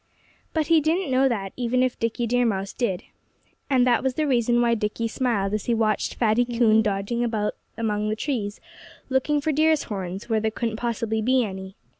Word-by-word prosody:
But 315 -1 0
he 325 0 +4
didn't 325 +1 0
know 265 +1 +4
that, 195 -5 -3
even 250 +1 +1
if 255 -1 -1
Dickie 230 +1 -1
Deer 245 +2 +2
Mouse 195 -4 -1
did. 195 -8 -2 0.7
And 255 -3 +4
that 245 -2 +3
was 265 -1 -1
the 310 - 0
reason 240 -3 +2
why 235 -1 +3
Dickie 215 +1 -1
smiled 225 -5 -1
as 215 - -2
he 235 - +1
watched 215 -1 0
Fatty 230 +1 +2
Coon 235 -2 +3
dodging 210 +3 -1
about 220 -3 -1 0.2
among 215 -2 -1
the 215 - 0
trees, 220 -5 -3 0.5
looking 270 +3 +1
for 310 - 0
deer's 310 +1 +3
horns 190 -2 -5
where 225 -2 +1
there 220 0 0
couldn't 225 0 -3
possibly 230 -2 -1
be 255 +3 +3
any. 190 -1 -7
235 Hz, 195 wpm, -24 LUFS, 215-255 Hz, 0.7 s, he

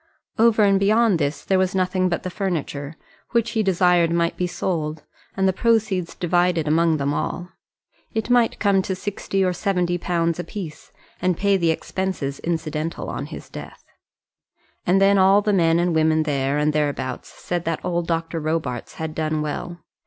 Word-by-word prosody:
Over 225 -1 +5
and 195 -1 +4
beyond 210 -1 +3
this 145 0 -2
there 190 -1 +2
was 185 0 0
nothing 185 0 +1
but 170 - -2
the 185 - -4
furniture, 160 -6 -3 0.4
which 235 -1 +2
he 225 -2 +1
desired 180 -3 +3
might 170 0 +1
be 180 - -1
sold, 155 -4 -3 0.3
and 190 0 +3
the 190 - +2
proceeds 215 -5 +1
divided 175 -2 +1
among 160 +1 +3
them 140 0 -1
all. 175 +4 -3 0.6
It 220 -1 -2
might 245 -2 +3
come 200 -2 +3
to 190 0 -3
sixty 195 0 -2
or 180 - +1
seventy 180 -2 0
pounds 170 -1 0
a - - -2
piece, 175 -8 -8 0.3
and 180 -2 +1
pay 200 0 +2
the 170 -3 +2
expenses 160 -4 -2
incidental 160 -1 -3
on - - -4
his - - -9
death. - - -10 1.0
And 185 +2 +4
then 195 0 +5
all 195 +2 +5
men 170 -6 +3
and 175 0 +1
women 160 0 +3
there 140 -2 0
and 150 +1 +1
thereabouts 145 -3 -2
said 175 -1 -4
that 165 -1 -2
old 175 -1 -1
Dr. 165 0 -1
Robarts 155 -6 -3
had 160 -1 -4
done 155 -1 -1
well. 175 +3 -5
175 Hz, 175 wpm, -22 LUFS, 160-190 Hz, 1.0 s, Over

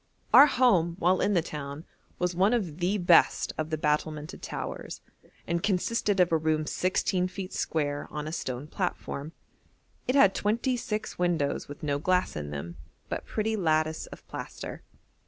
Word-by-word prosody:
Our 285 - +10
home 195 - +3
while 180 +1 +2
in 205 - +2
the 170 - +3
town 145 -1 -6 0.3
was 180 0 0
one 190 +6 +3
of 180 -9 -3
the 185 +4 +1
best 175 -3 +4
of 155 0 -3
the 155 - -1
battlemented 150 0 -1
towers, - - -5 0.5
and 170 0 -1
consisted 205 +1 +1
of 180 -1 +4
a 165 - +4
room 155 -1 0
sixteen 185 +1 0
feet 185 0 -7
square, 145 -2 -1
on 150 0 -5
a - - -4
stone 130 -4 -4
platform. 155 -4 -4 0.8
It 255 - +1
had 200 -9 +6
twenty 230 +5 0
six 215 -5 -4
windows 170 -5 0
with 145 +1 -10
no 145 -1 0
glass 180 +4 +1
in 75 -1 -4
them, 75 +4 -6 0.3
but - - -4
pretty 220 0 -1
lattice 155 -4 +1
of - - -13
plaster. - - -7
170 Hz, 165 wpm, -28 LUFS, 150-195 Hz, 0.8 s, Our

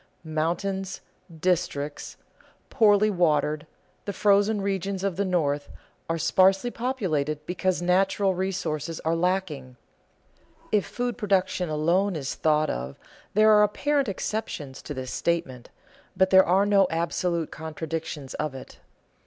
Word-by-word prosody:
Mountains, 180 +5 -2 0.3
districts 160 -4 -2 0.5
poorly 210 -1 +4
watered, 155 -4 +1 0.4
the 200 - -3
frozen 205 +2 +3
regions 195 -1 -2
of 195 -3 -1
the 200 - 0
North, 150 -6 0 0.4
are 165 - 0
sparsely 190 +7 +3
populated 155 - -2
because 180 +1 -1
natural 190 +2 +2
resources 175 -4 -3
are 160 +1 0
lacking. 165 -7 -2 1.0
If 210 -2 +2
food 245 0 -3
production 190 -4 0
alone 170 +6 +1
is 140 -4 -3
thought 155 -1 +1
of 65 +2 -5 0.4
there 215 +1 +6
are 210 -1 +6
apparent 275 +5 +1
exceptions 180 -9 -4
to 145 - -7
this 130 -1 -5
statement, 135 -8 -2 0.5
but 190 0 +3
there 190 0 +7
are 190 +3 +4
no 200 -2 +4
absolute 170 0 -1
contradictions 160 -2 -5
of 150 -3 -3
it. 130 - -11
180 Hz, 125 wpm, -26 LUFS, 155-195 Hz, 1.0 s, there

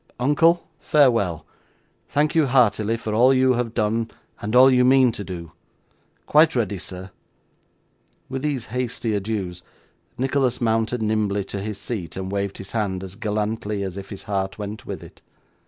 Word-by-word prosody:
Uncle, 165 +6 +3
farewell! 115 - +2 0.6
Thank 150 +2 +1
you 160 -4 +3
heartily 115 -3 +3
for 110 -2 -4
all 125 +4 +5
you 130 0 +4
have 120 -2 -2
done 110 +2 0 0.3
and 105 +3 -2
all 130 +1 +8
you 125 -1 +4
mean 130 -1 +5
to 105 - -6
do. 85 -4 -7 0.7
Quite 155 0 +4
ready, 105 -5 0
sir!' 95 +1 -8 1.2
With 135 0 -4
these 140 -5 -2
hasty 125 -2 -2
adieux, 100 -3 -2 0.6
Nicholas 130 -1 +1
mounted 115 0 0
nimbly 105 -2 0
to 100 0 -6
his 105 0 -4
seat, 100 -8 -5
and 95 0 -4
waved 100 -1 -2
his 95 - -9
hand 100 -4 -2
as 95 -1 -8
gallantly 105 -1 -2
as 95 -2 -5
if 100 -1 -8
his 100 - -8
heart 100 -1 -2
went 105 +1 -7
with - - -6
it. - - -15
110 Hz, 160 wpm, -23 LUFS, 100-125 Hz, 1.2 s, all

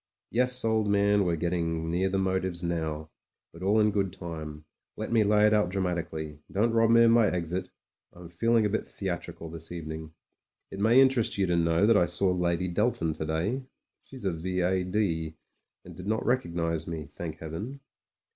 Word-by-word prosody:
Yes, 125 +1 +1
old 110 -1 +2
man, 100 0 +3
we're 85 -1 +1
getting 80 -1 -1
near 95 +3 +1
the 95 - -1
motives 95 -2 -1
now; 80 -2 -3 0.4
but 85 - -13
all 100 +4 +3
in 105 0 +4
good 100 -2 0
time. 80 -4 -7 0.3
Let - - -4
me 115 -2 +4
lay 105 +1 +4
it 105 - +4
out 105 -4 +3
dramatically; 85 -5 -3
don't 115 +4 +2
rob 115 0 +4
me 115 0 +6
of 115 - +6
my 115 -2 +5
exit 90 +1 -3 0.2
— - - -64
I'm 90 -1 -11
feeling 115 +6 +2
a - - +1
bit 110 - -2
theatrical, 85 -3 -4
this 80 0 -8
evening. 80 -1 -7 0.6
It 95 - -7
may 115 +5 +5
interest 130 -6 +3
you 100 - +2
to 90 -1 +1
know 85 +2 +3
that 110 -1 +5
I 85 - +3
saw 90 +2 +1
Lady 90 0 0
Delton 85 -3 0
to 80 0 -4
day: 90 - -1 0.4
she's 130 -6 -11
a 95 - +1
V.A.D., 90 -1 -1 0.5
and - - -11
did 90 +1 -8
not 110 +1 -1
rec 125 +1 +2
ognise 85 -2 -2
me, 80 -3 -5
thank 80 +2 -7
Heaven 100 - -6
90 Hz, 190 wpm, -28 LUFS, 85-105 Hz, 0.6 s, me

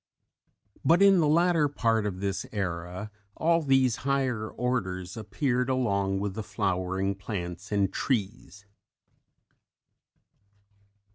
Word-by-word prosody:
But 175 +4 +5
in 195 -2 +6
the 155 - +3
latter 165 0 +3
part 115 -6 +1
of 95 -2 -5
this 100 -1 -2
era, 90 +1 -4 0.3
all 165 +1 +3
these 135 -5 +3
higher 130 -5 -1
orders 95 -7 -2
appeared 125 +4 -1
along 100 -7 0
with 100 -1 -2
the 110 - -4
flowering 95 0 -1
plants 95 -1 -6
and 100 -2 +1
trees. 100 -5 -3
105 Hz, 110 wpm, -28 LUFS, 95-130 Hz, 0.3 s, in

